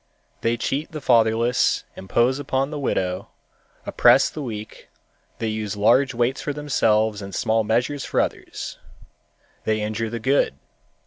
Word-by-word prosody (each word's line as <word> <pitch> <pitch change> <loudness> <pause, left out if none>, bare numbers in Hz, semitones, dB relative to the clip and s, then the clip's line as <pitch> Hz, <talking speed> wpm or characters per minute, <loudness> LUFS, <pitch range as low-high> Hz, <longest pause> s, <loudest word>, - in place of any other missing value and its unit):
They 115 +1 +1
cheat 140 +6 -2
the 155 - -4
fatherless, 115 -1 +2
impose 120 +7 +1
upon 135 0 -1
the 150 - -4
widow, 95 -8 -1 0.6
oppress - - +5
the 155 - -6
weak; 110 -5 -7 0.5
they 115 - -3
use 110 -2 -3
large 130 +6 +3
weights 120 +2 0
for 145 - -3
themselves 110 -7 +1
and 100 -2 -7
small 110 0 +1
measures 125 +6 0
for - - -1
others. - - -3 0.8
They 110 0 0
injure 110 +1 -2
the 120 - -4
good. 130 - +2
115 Hz, 140 wpm, -23 LUFS, 110-135 Hz, 0.8 s, oppress